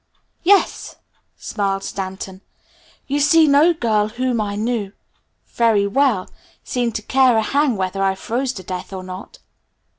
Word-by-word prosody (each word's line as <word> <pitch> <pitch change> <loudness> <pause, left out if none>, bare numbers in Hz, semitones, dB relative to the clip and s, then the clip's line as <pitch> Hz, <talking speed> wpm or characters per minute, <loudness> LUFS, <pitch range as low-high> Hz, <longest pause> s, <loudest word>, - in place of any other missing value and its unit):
"Yes!" 390 +3 +2 0.4
smiled 195 -1 -2
Stanton. 190 0 -6 0.6
"You 285 +1 -1
see 310 +2 +5
no 295 +4 +5
girl 220 -9 0
whom 245 0 -1
I 205 -1 -3
knew 215 -2 -2 0.6
very 225 -4 +2
well 220 -3 +1 0.4
seemed 240 -3 -2
to 215 - -3
care 255 -1 +3
a 220 - +2
hang 280 -2 +1
whether 190 +1 -2
I 195 0 +2
froze 245 +6 -2
to 190 - -8
death 185 +1 -6
or 185 -1 -6
not." 185 - -9
220 Hz, 145 wpm, -20 LUFS, 195-265 Hz, 0.6 s, see